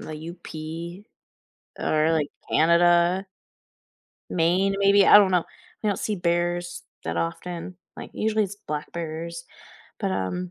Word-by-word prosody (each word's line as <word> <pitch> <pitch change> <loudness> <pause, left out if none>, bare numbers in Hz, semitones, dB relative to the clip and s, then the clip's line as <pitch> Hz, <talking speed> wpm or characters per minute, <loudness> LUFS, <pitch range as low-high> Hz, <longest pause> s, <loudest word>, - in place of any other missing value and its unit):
the 155 - -7
UP 170 +2 -8 0.8
or, 155 +1 +2
like, 155 -3 0 0.2
Canada 175 +3 +4 1.0
Maine, 185 +4 +2
maybe. 200 0 +5
I 205 - +10
don't 195 -2 +4
know. 180 -2 +3 0.4
I - - +2
don't 200 - 0
see 210 -2 -2
bears 175 0 -1 0.2
that - - -3
often, 175 +2 -4 0.2
like, - - -8
usually 215 -1 +1
it's 200 +1 -7
black 150 0 -4
bears, 170 0 -5 0.5
but, 95 - -1
um, 90 -1 -3
170 Hz, 130 wpm, -25 LUFS, 160-190 Hz, 1.0 s, I